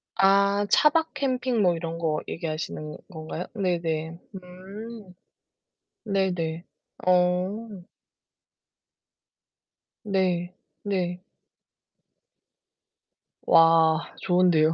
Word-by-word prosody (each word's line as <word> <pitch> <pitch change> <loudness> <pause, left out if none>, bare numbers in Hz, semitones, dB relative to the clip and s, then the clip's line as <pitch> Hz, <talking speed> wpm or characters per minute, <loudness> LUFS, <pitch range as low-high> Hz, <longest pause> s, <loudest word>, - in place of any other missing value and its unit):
아 200 +1 +4
차박 320 +2 +3
캠핑 255 -4 0
뭐 180 -3 +3
이런 165 0 -5
거 155 -2 -1
얘기하시는 155 -2 -5
건가요? 160 +1 -6
네네. 170 -4 -2 0.2
음. 190 +3 -10 0.9
네네. 180 -5 -1 0.4
어. 180 +2 +2 2.5
네. 180 -3 0 0.3
네. 180 -3 -2 2.2
와 165 -1 +4
좋은데요. 175 -3 +3
180 Hz, 120 characters per minute, -25 LUFS, 165-200 Hz, 2.5 s, 아